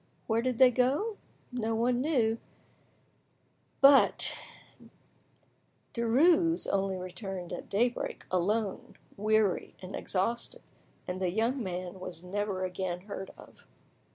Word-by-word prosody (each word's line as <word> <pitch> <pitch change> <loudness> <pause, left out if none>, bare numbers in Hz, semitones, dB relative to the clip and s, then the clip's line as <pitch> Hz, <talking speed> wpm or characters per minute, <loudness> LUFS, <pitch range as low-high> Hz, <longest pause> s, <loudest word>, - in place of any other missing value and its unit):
Where 225 0 +1
did 250 -1 -1
they 255 0 +7
go? 280 - +1 0.3
No 225 -2 -1
one 245 +2 +1
knew; 235 -7 +1 1.4
but 275 0 +6 1.6
Denies 330 +9 +3
only 195 -1 0
returned 185 0 -6
at - - -7
daybreak, 240 +4 -1
alone, 195 +3 -1 0.2
weary 215 -1 +1
and 185 +1 -7
exhausted, 230 +6 -2 0.4
and 180 +1 -4
the 185 - +1
young 230 +8 0
man 185 -1 -5
was 180 -2 -6
never 195 0 -2
again 180 -1 -3
heard 195 -1 -7
of. - - -16
215 Hz, 110 wpm, -30 LUFS, 185-245 Hz, 1.6 s, they